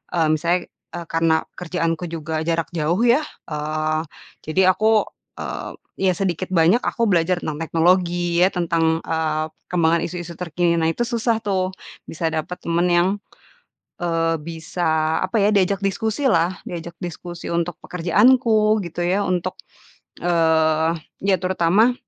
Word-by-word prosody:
eee, 165 -2 +3
misalnya, 170 +3 +1 0.4
eee, 170 -1 -5
karena 165 -1 +2 0.2
kerjaanku 165 -1 -2
juga 160 -1 -4
jarak 165 -1 0
jauh 170 +4 0
ya, 240 +3 +5 0.3
eee, 155 +1 -1 0.5
jadi 185 +4 +4
aku, 215 +3 +3 0.4
eee, - - -5 0.3
ya 190 -1 +3
sedikit 185 -1 -2
banyak 175 +5 +4
aku 230 -1 0
belajar 175 0 +2
tentang 150 -1 -4
teknologi, 175 +1 +2
ya, - - +6
tentang, 165 -2 +1
eee, 155 -1 -1 0.2
perkembangan 170 -1 +2
isu-isu 175 0 -6
terkini. 175 0 0
Nah, 160 0 +2
itu 240 - -1
susah 230 -1 0
tuh, 190 -3 0 0.4
bisa 165 0 -2
dapat 160 +3 -3
temen 170 +1 +1
yang, 175 +1 +3 0.9
eee, 165 -1 +1
bisa, 160 0 -1
apa 190 +4 -1
ya, 200 - +4
diajak 195 0 +2
diskusi 220 +6 -1
lah, 175 -2 +2
diajak 170 -1 -7
diskusi 175 0 -7
untuk 170 0 -1
pekerjaanku, 215 +4 +3
gitu 170 +1 -5
ya, 190 +3 +1
untuk, 180 -1 -1 0.7
eee, 160 -2 +3 0.3
ya 195 -1 +4
terutama 185 +6 +3
175 Hz, 140 wpm, -21 LUFS, 165-185 Hz, 0.9 s, ya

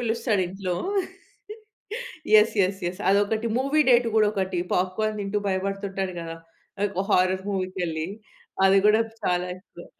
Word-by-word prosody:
పిలుస్తాడు 225 -3 0
ఇంట్లో. 185 -1 -3 1.7
Yes. 220 - 0
Yes. 195 +1 -6
Yes. 180 - -12
అదొకటి 205 +3 +1
మూవీ 275 +4 +2
డేట్ 240 -1 +5
కూడా 215 -1 +5
ఒకటి. 190 -3 -2 0.2
పాప్‌కోర్న్ 210 +4 0
తింటూ 200 +1 -1
భయపడుతుంటాడు 195 0 -2
కదా! 165 0 -6 0.7
హారర్ 185 +1 +2
మూవీకి 185 -1 -3
వెళ్లి. 160 -1 -3 0.6
అది 195 +1 +5
కూడా 215 +1 +5 0.2
చాలా 180 0 0
ఎక్కువ. 180 -2 -14
195 Hz, 125 wpm, -25 LUFS, 185-215 Hz, 1.7 s, డేట్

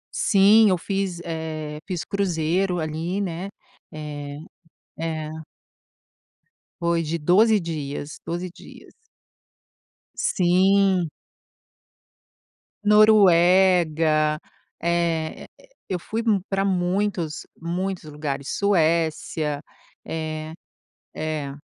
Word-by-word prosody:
Sim, 210 +2 +5
eu 185 - +2
fiz, 195 -1 -2
eh, 155 -2 -5
fiz 180 -3 -3
cruzeiro 180 -1 0
ali, 160 +4 -3
né, 185 -1 -3 0.4
eh, 145 -2 -7 0.6
é. 160 -1 -3 1.5
Foi 170 0 +1
de 160 +2 -2
12 205 +7 +4
dias, 150 -3 -5
12 175 +2 -3
dias. - - -14 1.2
Sim. 185 0 +3 1.7
Noruega, 180 -7 +5 0.4
eh, 170 -2 -1 0.4
eu 185 - -1
fui 220 +6 -4
m 215 -4 +2
pra 195 0 0
muitos, 180 -3 -1
muitos 180 +3 -3
lugares, 140 -2 -4
Suécia, 160 -5 +1 0.4
eh 155 -1 -4 0.6
é. 150 -3 -4
170 Hz, 80 wpm, -23 LUFS, 155-190 Hz, 1.7 s, Sim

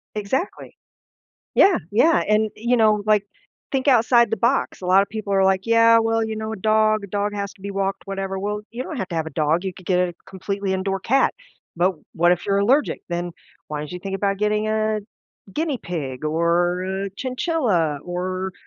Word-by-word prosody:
Exactly. 215 - -3 0.8
Yeah, 385 -3 +6
yeah, 295 +11 +4
and 215 0 +2
you 240 +3 +1
know, 215 -2 +3
like, 210 -1 +3 0.5
think 270 +1 0
outside 235 -1 +5
the 225 - 0
box, 235 +2 0
a 180 - -6
lotta 195 +2 +5
people 210 -1 -5
are 195 -1 +3
like, 190 +1 +2
"Yeah, 230 0 +6
well 225 0 +1
you 220 0 -4
know, 220 0 -4
a - - -4
dog, 215 +1 +2
a - - -6
dog 205 +1 -2
has 200 -1 -4
to - - -24
be 200 +1 -5
walked, 195 0 -2
whatever." 195 -1 -3
Well 210 +2 -3
you 240 +2 -5
don't 310 - -6
have 190 -5 -3
to 170 - -6
have 160 - -1
a 160 - -5
dog, 160 +3 0
you 190 - -2
could 185 - -15
get 180 -2 +2
a 180 -1 0
completely 195 +1 -3
indoor 195 0 -1
cat, 270 +7 +2 0.4
but 180 +3 +2 0.2
what 175 +1 +4
if 175 - -3
you're 200 0 +2
allergic, 255 +9 +2
then 175 0 -3 0.3
why 150 - -4
don't 150 - -7
you 180 - -5
think 195 +1 -4
about 195 -1 -1
getting 210 +1 0
a 215 0 0 0.5
guinea 305 -4 -1
pig, 145 - -5
or 170 +3 +1
a 195 +1 -3
chinchilla, 250 - 0
or 185 +1 -3
200 Hz, 205 wpm, -22 LUFS, 185-220 Hz, 0.8 s, Yeah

